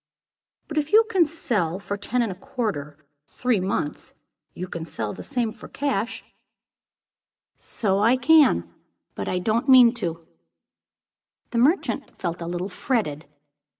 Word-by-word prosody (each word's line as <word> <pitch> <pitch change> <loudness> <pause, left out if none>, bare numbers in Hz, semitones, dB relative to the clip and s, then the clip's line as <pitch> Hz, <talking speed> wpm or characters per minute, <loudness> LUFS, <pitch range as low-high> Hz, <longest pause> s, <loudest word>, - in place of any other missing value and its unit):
"But 310 -1 -1
if 300 0 -3
you 445 +1 +7
can 365 -5 +4
sell 215 - -1
for 200 +1 -4
ten 235 +5 -1
and 225 - -2
a - - -6
quarter, 200 - -4 0.3
three 250 - 0
months, 185 -5 -3 0.4
you 180 - -5
can 170 -2 -6
sell 110 -10 -4
for - - -12
the - - -7
same, 240 -5 -2
cash." 235 -1 -3
"Yes, - - -33 1.3
so 195 -3 0
I 230 +5 +4
can; 265 - +5 0.5
but 100 - -5
I 185 - 0
don't 220 +8 0
mean 250 -3 +8
to 240 - -8
do 165 - -17
it." 160 - -31 1.2
The 235 - 0
merchant 300 +10 +1
felt 170 -1 -4
a 170 - -4
little 175 +2 -3
fretted. 180 - -2
215 Hz, 155 wpm, -24 LUFS, 175-255 Hz, 1.3 s, mean